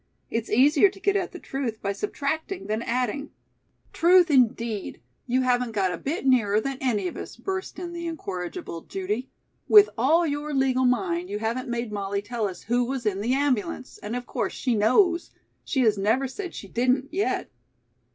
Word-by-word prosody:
It's 230 0 -2
easier 290 - +5
to 390 - -14
get 400 +1 +1
at 370 -3 0
the - - -8
truth 265 -9 -4
by 200 - -2
subtracting 320 - -3
than 215 +1 -2
adding 250 +4 -2 0.3
" - - -40
"Truth, 350 0 +5
indeed. 230 -5 +1 0.3
You 255 +1 +2
haven't 245 -2 +1
got 195 -3 +1
a - - -4
bit 290 +2 -3
nearer 220 -6 +4
than 270 +3 -4
any 215 -8 0
of - - -6
us," - - -7
burst 380 -1 -4
in 350 -1 -6
the 340 0 -4
incorrigible 180 - -5
Judy. 205 +9 -4 0.4
"With 420 -1 +8
all 320 +8 +4
your 295 -1 -2
legal 260 -1 +2
mind 345 +7 0
you 205 - -2
haven't 230 +4 -2
made 235 -2 -3
Molly 200 -1 -2
tell 225 0 -2
us 185 - -8
who 240 +2 +1
was 255 -1 -3
in 200 -2 0
the 245 +5 +1
ambulance, 260 -3 -1
and 210 +3 -4
of 245 0 -4
course - - -2
she 250 - -1
knows. 340 - +3 0.3
She 265 - 0
has 215 -4 +3
never 225 +7 +2
said 360 +7 -7
she 200 - -7
didn't, 255 +7 0
yet." 370 -8 -1
255 Hz, 190 wpm, -25 LUFS, 220-300 Hz, 0.4 s, With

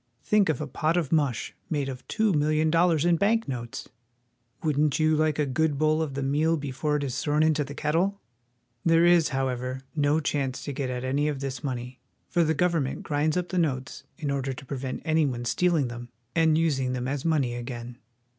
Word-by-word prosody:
Think 210 -4 +3
of 155 - 0
a 150 - -2
pot 155 +4 0
of 165 -6 -1
mush 145 -7 0 0.2
made 145 -5 -1
of 130 -2 -7
two 220 -3 +1
million 155 +1 +2
dollars 165 -2 +3
in 175 -1 +4
bank 225 +5 +2
notes! 120 -3 -5 0.8
Wouldn't 150 -2 +2
you 155 0 +3
like 155 -1 +1
a 150 - +2
good 145 +2 0
bowl 155 +1 +2
of 145 -4 -3
the 140 - -2
meal 155 +4 +2
before 145 +1 -2
it 145 - -1
is 130 -3 -2
thrown 150 +1 +2
into 155 -1 +2
the 140 +1 -8
kettle? 170 +8 0 0.6
There 165 0 +4
is, 175 -2 +5
however, 130 -1 -2 0.2
no 145 +1 +2
chance 140 -4 -2
to 145 - -4
get 135 -1 -3
at 125 0 -3
any 140 +3 0
of 145 -3 -2
this 135 0 -5
money, 125 -2 -4 0.3
for 175 -2 +2
the 160 0 +1
government 165 -4 0
grinds 150 +2 0
up 180 -1 -2
the 185 - 0
notes 135 -5 -2
in 150 -5 -2
order 135 -1 -1
to 130 - -10
prevent 130 -1 -5
any 160 -2 +3
one 120 -2 -4
stealing 165 +2 +2
them 120 0 -8 0.2
and 160 -2 +3
using 135 -6 +1
them 125 0 -2
as 135 0 -2
money 145 -7 +1
again. 120 0 -6
150 Hz, 205 wpm, -27 LUFS, 130-160 Hz, 0.8 s, is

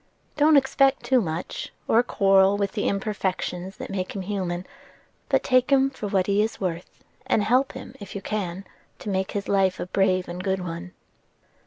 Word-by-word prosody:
Don't 300 0 +5
expect 270 0 +3
too 260 -2 +3
much, 165 -2 -4 0.2
or 230 - +5
quarrel 195 -4 +4
with 200 -1 -1
the 205 - -1
imperfections 190 -2 -2
that - - -7
make 185 0 -3
him 195 - -3
human; 185 -2 -3 0.6
but - - +2
take 255 +1 +3
him 270 0 +4
for 215 -6 -5
what 195 -2 +1
he 200 +1 +2
is 220 +1 -2
worth, 175 -2 -5 0.2
and 210 - +2
help 255 +5 +2
him - - -9
if 205 -1 -9
you 200 - -4
can 195 -2 -3 0.3
to - - -7
make 190 -1 -1
his 200 -1 -3
life 195 -2 +2
a - - -2
brave 185 0 +1
and 180 +1 -6
good 190 -1 0
one." 170 +1 -6
195 Hz, 185 wpm, -25 LUFS, 185-215 Hz, 0.6 s, Don't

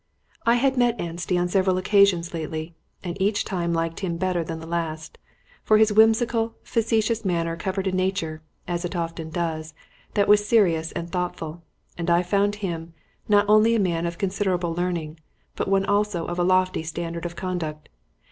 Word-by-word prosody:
I 235 - +6
had 265 +2 +2
met 240 -1 +2
Anstey 175 +2 -2
on 175 0 +1
several 185 0 +2
occasions 185 -3 +3
lately, 160 0 -4 0.3
and 175 -2 -4
each 205 +2 +1
time 175 -3 -2
liked 165 0 -1
him 175 -4 -2
better 180 -1 0
than 165 0 -5
the 160 - -9
last; 160 -2 -4 0.4
for 215 - +4
his 215 -1 +4
whimsical, 225 +1 +3
facetious 225 0 0
manner 170 -3 0
covered 190 +3 -3
a 190 - +1
nature 185 -4 -1 0.3
(as 175 0 -2
it 175 +1 -4
often 165 -1 -3
does) 160 -2 -3 0.4
that 200 -1 +3
was 210 0 +5
serious 170 -8 +3
and 170 0 -5
thoughtful; 175 -2 -4 0.4
and 170 +1 -1
I 170 +1 +4
found 200 +3 +1
him, 165 -2 -5 0.3
not 205 0 +5
only 215 +2 +5
a - - +2
man 170 -3 0
of 170 0 -5
considerable 185 -3 -1
learning, 170 -3 -3 0.4
but - - -2
one 195 0 +2
also 205 -4 0
of 175 +1 -4
a - - +3
lofty 185 -1 +2
standard 170 +1 -4
of 170 - -10
conduct. 165 -5 -4
180 Hz, 175 wpm, -24 LUFS, 165-205 Hz, 0.4 s, I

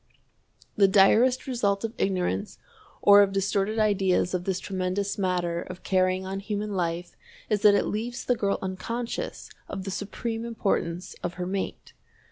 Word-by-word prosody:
The 200 -2 +6
direst 220 +6 +4
result 205 -6 0
of 225 0 -3
ignorance 195 +2 -1 0.5
or 205 0 +8
of 200 -1 +3
distorted 195 +2 0
ideas 195 -4 +2
of 180 -1 -2
this 190 -2 -1
tremendous 190 +1 -2
matter 175 -3 0
of 185 0 -9
carrying 185 0 +1
on 195 +1 -4
human 210 +1 -3
life 175 -1 -2 0.4
is 210 -1 +2
that 205 -1 +7
it 200 - +2
leaves 235 +3 -3
the 250 - +3
girl 200 -3 0
unconscious 230 - -4 0.2
of 190 -1 -5
the 195 - -4
supreme 225 +4 -4
importance 195 -6 -2
of 175 0 -4
her 180 - -3
mate. 190 +1 -4
195 Hz, 155 wpm, -26 LUFS, 185-210 Hz, 0.5 s, or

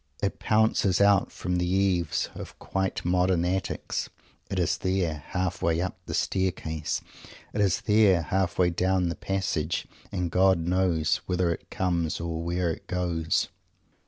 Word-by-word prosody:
It 100 - -1
pounces 110 -4 +2
out 100 -1 +4
from 90 -1 -2
the 90 0 0
eaves 90 -3 +1
of - - -9
quite 95 -2 -2
modern 90 -1 +2
attics. 90 -1 -2 0.4
It - - -3
is - - +1
there, 90 -6 -1
halfway 85 -2 0
up 95 +1 -2
the - - -2
Staircase. 80 -5 -1 0.5
It 105 - 0
is 95 -3 +2
there, 105 -5 +4
halfway 90 0 +1
down 90 +1 +1
the 85 - -3
Passage. 85 -5 -1 0.3
And 90 -2 -2
God 95 +1 +4
knows 85 -1 +1
whither 90 -1 +1
it - - -11
comes 85 -3 -1
or 85 -1 -3
where 85 0 0
it - - -8
goes! 85 -3 0
90 Hz, 145 wpm, -27 LUFS, 85-95 Hz, 0.5 s, out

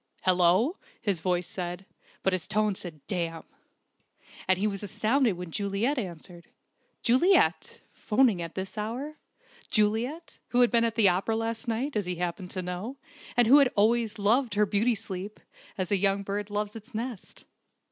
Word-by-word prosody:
"Hello!" 185 - +3 0.2
his 200 -6 -1
voice 180 +1 0
said: 180 +1 -4 0.4
but 190 - +2
his 185 -3 -2
tone 215 0 +1
said 165 -6 -8
"Damn!" 165 -4 -3 1.0
And 185 0 +4
he 200 - 0
was 200 -2 -1
astounded 215 +4 +1
when 180 -2 -7
Juliet 205 - 0
answered. 175 -3 -8 0.6
Juliet! 260 +11 +3
'phoning 220 -5 +2
at 165 -1 -6
this 190 +3 -5
hour! 255 +8 -4 0.5
Juliet, 235 +9 0
who 245 - +3
had 245 - +4
been 235 -1 +4
at 230 - -1
the 220 -3 +5
opera 190 +5 +1
last 225 +2 -2
night, 240 +5 -2
as 205 -4 -1
he 180 - -2
happened 180 +1 -4
to 185 0 -4
know, 180 +9 -5 0.4
and 240 - +6
who 270 +6 +8
had 275 -3 +4
always 225 +1 +2
loved 220 +2 +2
her 210 +1 +4
beauty 215 +4 +2
sleep, 200 -1 -7 0.4
as 185 -1 -3
a 200 - +4
young 195 +1 +1
bird 200 +1 -3
loves 210 +1 -3
its 225 +2 -11
nest! 230 -2 -6
210 Hz, 165 wpm, -28 LUFS, 185-230 Hz, 1.0 s, who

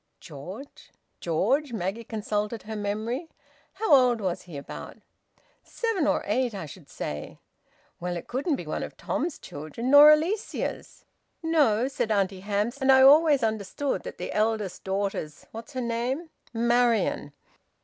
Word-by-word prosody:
"George? 180 - -10 0.3
George?" 235 - 0
Maggie 205 +2 -3
consulted 210 0 -3
her 220 +1 -6
memory. 215 +9 -3 0.4
"How 440 -8 +1
old 250 -4 +5
was 185 -4 -2
he, 155 - -7
about?" 140 - -8 0.7
"Seven 440 -10 -1
or - - +1
eight, 240 +2 0
I 190 - -5
should 150 0 -13
say." 75 0 -6 0.6
"Well, 175 0 -3
it 170 - -8
couldn't 280 +5 -1
be - - -7
one - - -3
of - - -7
Tom's 340 -3 -2
children. 155 - -5
Nor 290 +1 +10
Alicia's." 330 +8 0 0.4
"No," 280 -8 +3
said 250 -5 -2
Auntie 195 -2 +1
Hamps. 210 +7 -2
"And 265 0 +5
I 265 0 +7
always 290 -1 +6
understood 220 +5 -1
that - - -8
the - - -5
eldest 215 -4 -1
daughter's 195 -5 -3
what's 225 +6 -9
her 255 - -2
name?" 250 +7 -2 0.2
"Marian." 235 -8 +1
225 Hz, 145 wpm, -27 LUFS, 200-270 Hz, 0.7 s, Nor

